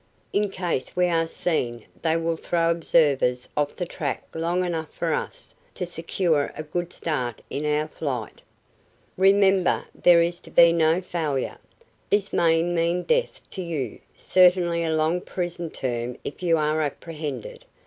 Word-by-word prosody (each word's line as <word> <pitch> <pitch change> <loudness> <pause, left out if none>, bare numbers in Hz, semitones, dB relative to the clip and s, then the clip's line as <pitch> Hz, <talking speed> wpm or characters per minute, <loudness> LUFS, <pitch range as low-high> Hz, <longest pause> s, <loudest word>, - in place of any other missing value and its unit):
In 205 0 +1
case 180 -8 -3
we 180 0 +3
are 165 -1 +1
seen 120 -10 -2 0.2
they 160 0 +2
will 165 0 0
throw 165 +1 +1
observers 145 -7 +2
off 145 -1 0
the 180 - -3
track 145 -4 -4
long 170 +3 0
enough 160 -3 -3
for - - -1
us - - -5 0.2
to 180 - -2
secure 165 -3 0
a 155 - -4
good 175 +3 -4
start 125 -8 -3
in 150 +2 -2
our 150 +1 +1
flight." 130 -8 -5 0.7
"Remember, 195 -1 +4
there 170 -1 +5
is 175 +1 -2
to - - -14
be 170 -1 +6
no 165 +1 +3
failure. 155 -7 -2 0.5
This 205 -1 +1
may 165 -1 +3
mean 175 +1 0
death - - 0
to 190 - -5
you; 155 - -4 0.2
certainly 180 -2 +4
a 160 -1 0
long 160 +3 +1
prison 175 -2 -4
term 120 -3 -3
if 145 - -7
you 170 -2 +3
are 155 +1 +1
apprehended. 150 -3 -5
165 Hz, 155 wpm, -25 LUFS, 150-175 Hz, 0.7 s, be